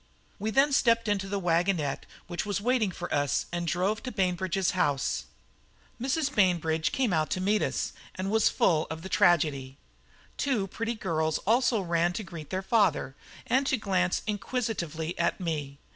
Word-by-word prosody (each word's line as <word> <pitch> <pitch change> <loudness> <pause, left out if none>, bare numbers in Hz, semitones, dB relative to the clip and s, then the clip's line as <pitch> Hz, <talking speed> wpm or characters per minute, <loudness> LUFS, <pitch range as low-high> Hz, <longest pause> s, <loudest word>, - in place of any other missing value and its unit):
We 215 +2 -1
then 275 +5 +3
stepped 230 -3 +3
into 200 -2 0
the 200 0 -1
wagonette 170 -4 0 0.2
which 175 -1 -3
was 205 -1 -2
waiting 235 -1 +1
for 175 -1 -5
us, 145 -3 +1
and 175 0 -3
drove 190 +5 0
to 255 - -5
Bainbridge's 185 -2 0
house. 140 - 0 0.8
Mrs. 275 +2 0
Bainbridge 165 -5 +2
came 250 -8 +1
out 155 -2 +1
to - - -1
meet 205 +3 +2
us, - - -1 0.2
and 190 +1 -3
was 220 0 +4
full 160 -2 +2
of 160 0 -6
the 190 - -6
tragedy. 145 -8 +2 0.6
Two 250 -8 0
pretty 230 +5 -3
girls 160 -6 0
also 230 0 +3
ran 170 -1 +1
to 215 - -4
greet 165 -6 -9
their 190 0 -2
father, 195 - +2 0.3
and 270 +2 +2
to 265 - +2
glance 185 -4 0
inquisitively 200 - -3
at 170 - +1
me. 150 -6 -3
185 Hz, 165 wpm, -28 LUFS, 165-215 Hz, 0.8 s, was